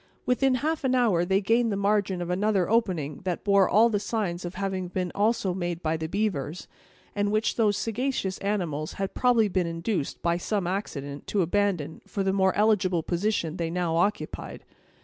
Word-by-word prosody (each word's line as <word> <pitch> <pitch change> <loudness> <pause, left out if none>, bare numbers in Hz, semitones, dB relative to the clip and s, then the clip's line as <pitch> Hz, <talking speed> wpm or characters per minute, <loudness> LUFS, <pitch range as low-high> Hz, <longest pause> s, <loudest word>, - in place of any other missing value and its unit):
Within 255 +1 +2
half 310 +4 -1
an 260 -1 +2
hour 215 -9 +3
they 190 +2 +2
gained 230 +3 +2
the - - 0
margin 200 -2 +1
of 175 - -4
another 195 0 +1
opening 180 -11 0
that 180 -2 -2
bore 200 -2 +4
all 220 +4 +6
the 215 -3 0
signs 200 -4 -2
of 175 +1 -6
having 190 -1 -2
been 180 0 -3
also 205 -2 +1
made 175 -1 -3
by 160 0 +1
the 160 0 -4
beavers, 180 -5 -2 0.5
and 205 0 0
which 215 +1 +1
those 210 -3 +2
sagacious 225 -4 -2
animals 170 -7 -2
had 195 -1 -3
probably 245 -4 +3
been 185 -3 0
induced, 165 -1 -2
by 170 0 +2
some 200 +1 -1
accident, 145 -7 -4
to 200 -3 +1
abandon, 175 -4 -1
for 200 - -2
the 190 0 +1
more 190 -1 +2
eligible 190 -5 +2
position 175 -2 -1
they 165 -1 -2
now 170 -1 -1
occupied. 200 +5 -2
195 Hz, 185 wpm, -26 LUFS, 175-215 Hz, 0.5 s, all